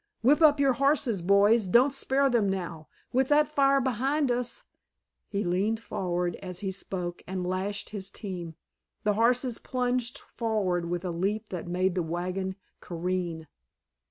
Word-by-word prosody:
Whip 290 +7 +5
up 300 -2 +6
your 275 -2 +4
horses, 270 - +2
boys, 200 +4 +4
don't 250 +8 +5
spare 275 0 +2
them 235 -6 +2
now! 170 -5 -4 0.3
With 260 +1 +3
that 300 +1 +4
fire 275 -2 +3
behind 265 +3 +1
us——" 245 0 -1 0.6
He 200 0 -2
leaned 195 +6 0
forward 180 -5 -2
as 180 -1 -7
he 195 -2 -2
spoke 180 -2 -4
and 185 -1 -3
lashed 190 +3 -3
his 195 -2 -6
team; 180 -6 -6 0.5
the 210 - +2
horses 240 +2 +2
plunged 250 0 -1
forward 190 -7 -2
with 175 +1 -3
a 180 - -1
leap 200 +6 -2
that 180 -2 -5
made 180 +1 +1
the 180 - 0
wagon 180 +3 -3 0.2
careen. 175 -1 -3
200 Hz, 155 wpm, -28 LUFS, 180-250 Hz, 0.6 s, up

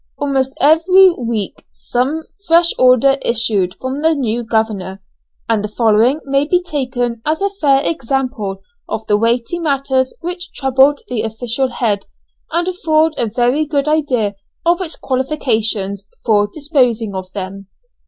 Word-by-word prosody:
Almost 270 -2 -1
every 360 +6 +6
week 230 - -4
some 270 +6 -2 0.2
fresh 335 +1 +4
order 255 +2 +4
issued 215 -7 +1
from 260 +2 -4
the 320 0 +3
new 240 -4 -1
governor, 220 -4 -2 0.5
and 220 -2 +1
the - - -2
following 225 +6 +2
may 275 +1 +1
be 360 +2 +3
taken 255 -8 -3
as 310 +1 0
a 400 0 0
fair 285 -8 +2
example 255 -9 -2 0.3
of 220 - -4
the 205 - +2
weighty 235 +9 0
matters 275 -4 0
which 350 0 -5
troubled 270 +2 +3
the 245 -3 -2
official 230 +4 -1
head, 220 -5 -1 0.4
and 345 +1 0
afford 320 -3 +1
a 235 - 0
very 245 +6 +1
good 290 -1 -1
idea 260 -9 +1 0.3
of 345 +2 +2
its 340 -3 -2
qualifications 220 -7 -1 0.2
for 205 -3 +3
disposing 250 - 0
of 185 -1 -6
them. 195 0 -6
260 Hz, 145 wpm, -17 LUFS, 220-300 Hz, 0.5 s, every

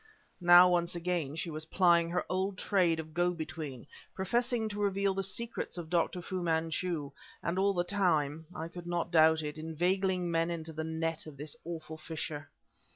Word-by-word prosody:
Now, 175 +1 +9
once 175 -1 +1
again 170 -4 -2
she 165 +1 -3
was 155 0 -5
plying 170 -1 +4
her 180 +1 -1
old 190 +1 -1
trade 175 -5 +2
of 160 -1 -7
go 175 +1 +2
between; 155 -6 -6 0.3
professing 235 +4 0
to 205 0 -4
reveal 200 -1 +1
the 195 - -1
secrets 210 +2 -2
of 165 -2 -7
Dr. 175 +1 +1
Fu 185 +1 -3
Manchu, 160 -2 -1 0.3
and 175 +2 -1
all 200 0 +3
the 175 - +2
time 160 -5 +1
I 160 +1 -4
could 175 0 -9
not 175 0 -1
doubt 160 -1 +5
it 150 +1 -5
inveigling 180 +3 0
men 165 0 +1
into 165 -1 -4
the 160 +1 -3
net 160 0 -2
of 150 -3 -10
this 150 +1 -5
awful 160 -1 -6
fisher. 155 -2 -5
170 Hz, 180 wpm, -31 LUFS, 160-185 Hz, 0.3 s, Now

